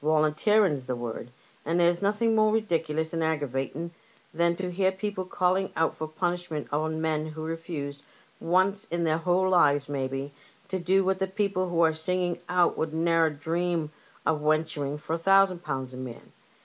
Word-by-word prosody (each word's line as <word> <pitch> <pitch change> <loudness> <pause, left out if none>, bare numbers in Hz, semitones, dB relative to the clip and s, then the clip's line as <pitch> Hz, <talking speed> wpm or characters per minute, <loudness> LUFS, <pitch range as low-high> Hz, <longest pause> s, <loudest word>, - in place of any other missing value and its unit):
Yolunteering's 155 0 +2
the 125 - -1
word; 120 0 -5 0.3
and 165 +3 0
there's 175 0 +3
nothing 210 +3 +2
more 215 0 +4
ridiculous 160 -7 0
and 165 -1 0
aggravating 150 +1 -2 0.4
than 170 +1 +2
to 180 0 -4
hear 190 +1 +2
people 190 -1 -4
caUing 185 +1 +1
out 160 0 +1
for 155 - -4
punishment 175 -1 -3
on 155 +1 0
men 155 -1 -1
who 155 0 -7
refused, 160 -3 -5 0.4
once 190 +5 +2
in 170 -3 -2
their 160 0 +1
whole 180 +2 +2
lives 145 -6 +4
maybe, 135 0 -3 0.3
to 190 - -2
do 190 +2 +2
what 190 0 +1
the 190 - 0
people 190 -2 -1
who 170 -1 +1
are 160 -1 +4
singing 175 +2 -1
out 180 -1 +3
would 160 0 -2
ne'er 165 0 +3
dream 165 +1 -2 0.3
of 155 -2 +1
wenturing 150 -2 0
for 155 +2 -5
a 165 - -1
thou 195 +3 +6
sand 180 -2 -8
pounds 130 -3 -4
a - - -8
man. 130 -2 -8
165 Hz, 175 wpm, -27 LUFS, 155-185 Hz, 0.4 s, thou